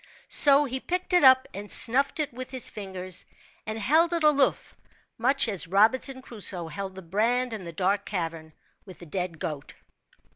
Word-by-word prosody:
So 285 0 +6
he 260 -1 -3
picked 360 +5 -4
it 355 - +4
up 260 -1 +6
and 205 +2 -8
snuffed 275 +6 +2
it 295 -5 -2
with 255 +1 -8
his 260 -3 -2
fingers, 185 -3 -1 0.4
and 215 0 -4
held 315 - +2
it 335 -2 0
aloof, 285 -3 +1 0.4
much 265 +3 +2
as 195 -5 -1
Robinson 255 +8 +2
Crusoe 190 -8 -2
held 190 +4 -7
the 190 - -10
brand 230 +7 0
in 205 -5 -7
the 170 - -7
dark 195 +4 -1
cavern 165 -5 -5 0.3
with 185 -3 -13
the 175 - -11
dead 180 0 -4
goat. 150 -3 -7
215 Hz, 175 wpm, -26 LUFS, 185-265 Hz, 0.4 s, So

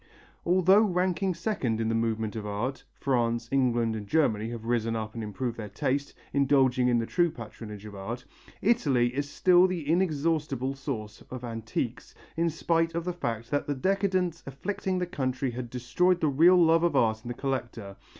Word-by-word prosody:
Although 185 +3 +5
ranking 185 -2 +1
second 165 - -1
in 115 - 0
the 115 - 0
movement 110 -1 -1
of 110 - -4
art 105 +6 -3
France, 120 -3 0
England 120 -4 +2
and 105 -2 -6
Germany 110 -7 +1
have 115 -1 -7
risen 115 -1 0
up 110 -1 -4
and 115 - -5
improved 115 +3 -4
their 105 -2 -6
taste, 135 +7 -2 0.2
indulging 135 -2 +3
in 120 -1 +3
the 115 - 0
true 175 +6 +2
patronage 105 -5 -9
of 105 - -9
art 105 +5 -6 0.4
Italy 140 - +2
is 145 +2 -2
still 180 +3 +5
the 175 -5 -4
inexhaustible 150 -5 0
source 110 -6 -6
of 125 -1 -7
antiques, 115 +3 -4 0.2
in 170 +1 +1
spite 165 +1 0
of 170 - -1
the 180 - -1
fact 115 -8 -4
that 145 - 0
the 145 - -1
decadence 185 +1 0
afflicting 185 +7 -3
the 180 - 0
country 130 -6 -2
had 120 0 -6
destroyed 130 +10 +1
the 155 - +2
real 165 +7 +6
love 165 -1 +5
of 170 0 +1
art 110 -1 +2
in - - -9
the 120 - -4
collector. 120 -7 -4
130 Hz, 180 wpm, -28 LUFS, 115-170 Hz, 0.4 s, real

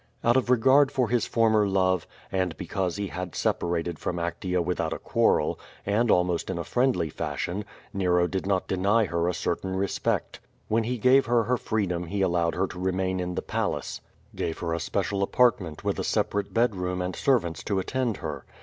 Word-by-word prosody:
Out 120 +1 +4
of 130 -2 +2
regard 130 +3 +5
for 125 -4 +1
his 120 0 +1
former 110 -3 +3
love, 95 -2 +1 0.2
and 95 -4 -1
because 90 -3 -2
he 100 -1 -3
had 90 -1 -5
sepa 85 - 0
rated 85 -1 -2
from 90 - -2
Actea 85 +1 -2
without 85 -2 -1
a - - -3
quarrel, - - +1 0.3
and 110 +4 +2
almost 90 -2 +2
in 95 - -2
a 85 - -2
friendly 120 - +1
fashion, 95 +7 -3 0.3
Nero 90 -2 +2
did 95 +1 -3
not 95 -2 0
deny 100 +4 +2
her 85 -2 -1
a 90 - +1
certain 95 +2 -2
respect. 95 +1 -1 0.3
When 110 +1 +2
he 125 +2 -1
gave 130 +4 +4
her 120 -1 +3
her 125 +3 +1
freedom 90 -7 -1
he 100 +2 -1
allowed 85 -2 +1
her 95 - +1
to 90 - -8
remain 95 0 0
in 90 0 -3
the - - -2
palace; - - -2 0.3
gave 80 - -2
her 85 -1 -2
a 85 - -1
special 100 +3 -1
apartment 100 -7 +2
with - - -1
a - - -1
separate 100 -1 0
bed 115 -2 +2
room 90 0 -2
and 90 0 -2
servants 85 - +1
to 100 - 0
attend 120 +3 -1
her. 75 -4 -4
95 Hz, 195 wpm, -26 LUFS, 90-110 Hz, 0.3 s, regard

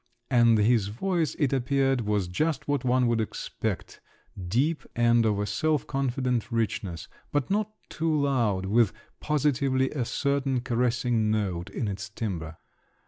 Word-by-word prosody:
And 120 -3 +5
his 105 -1 +3
voice, 165 - -1
it 140 -3 +1
appeared, 135 0 +1
was 105 -3 0
just 150 - -1
what 145 -3 0
one 125 0 +3
would 115 -1 +2
expect; 110 - -4 0.5
deep, 140 - +1
and 120 -1 +4
of 105 -2 +1
a 105 - -1
self 150 +9 0
confident 125 -3 -1
richness, 100 -7 -2 0.2
but 145 +3 -1
not 210 +1 +1 0.2
too 155 -2 0
loud, 115 -9 +1
with 105 0 +3 0.3
positively 140 -3 +1
a 135 -5 -1
certain 140 -1 0
caressing 120 -2 +1
note 95 -4 -1
in 110 +3 -3
its 100 0 -4
timbre. 90 -7 -5
120 Hz, 140 wpm, -27 LUFS, 105-140 Hz, 0.5 s, And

